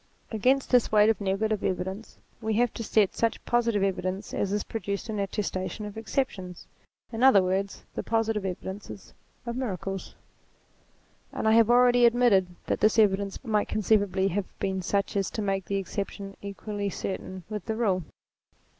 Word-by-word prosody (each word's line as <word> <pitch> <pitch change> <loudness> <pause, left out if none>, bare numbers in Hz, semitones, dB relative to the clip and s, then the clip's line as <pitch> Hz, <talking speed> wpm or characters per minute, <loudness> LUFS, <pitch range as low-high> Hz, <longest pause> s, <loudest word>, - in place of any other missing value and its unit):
Against 255 +5 +2
this 250 -2 +4
weight 210 0 +6
of 220 - -4
negative 205 +2 0
evidence 190 +4 -3 0.2
we 220 -1 -1
have 240 +1 +2
to 230 - -5
set 210 -2 +2
such 230 -1 -1
positive 230 -4 +2
evidence 190 +1 -2
as 200 - -1
is 205 0 0
produced 200 0 -4
in 210 - -3
attes 200 +1 -2
tation 185 +3 -4
of 210 0 -7
exceptions; 215 -6 -3 0.5
in 225 - -3
other 250 -8 +7
words, 190 +2 -2
the - - -3
positive 225 -2 0
evidences 190 +1 -6 0.3
of 235 0 -3
miracles. 195 -6 -4 1.2
And - - -2
I - - +5
have 225 0 +5
already 245 0 +6
admitted 230 -6 +4 0.2
that - - -1
this 215 +2 +3
evidence 200 -1 +2
might 215 -2 +1
conceivably 200 -2 +2
have 195 +1 -1
been 190 -1 -1
such 200 +3 -1
as 195 -2 +1
to 220 - -4
make 195 -2 -1
the 200 - -2
exception 195 0 -5
equally 200 0 -4
certain 185 0 -5
with 210 -3 -5
the 220 - -2
rule. 200 -5 +1
205 Hz, 165 wpm, -27 LUFS, 195-225 Hz, 1.2 s, other